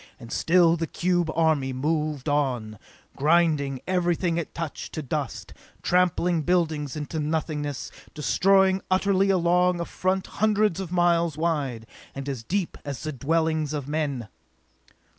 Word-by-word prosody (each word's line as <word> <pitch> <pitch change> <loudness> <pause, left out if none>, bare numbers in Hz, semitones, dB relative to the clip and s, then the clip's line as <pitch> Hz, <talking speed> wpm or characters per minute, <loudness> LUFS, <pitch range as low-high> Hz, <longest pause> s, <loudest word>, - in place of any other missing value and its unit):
And 115 -2 -11
still 170 -1 +4
the 165 0 -2
cube 175 -1 0
army 155 -5 +2
moved 150 +1 -1
in, 125 -8 -1 0.4
grinding 150 -3 +2
everything 175 -2 +1
it 170 - -4
touched 165 -3 -5
to 155 - -4
dust, 140 -1 -4 0.3
trampling 180 -1 +2
buildings 155 -5 0
into 150 +1 -4
nothingness, 150 -2 -2 0.2
destroying 190 +5 +3
utterly 195 +1 +2
along 180 -1 +3
a 170 - -2
front 185 +2 -1 0.2
hundreds 215 -4 +2
of 185 -3 -5
miles 170 -3 +2
wide, 145 -9 -1 0.3
and 135 0 -6
as 135 -5 -3
deep 180 - -2
as 140 -4 -6
the 155 - -2
dwellings 155 +2 0
of 145 -3 -4
men! 145 -6 -2
160 Hz, 135 wpm, -25 LUFS, 145-175 Hz, 0.4 s, still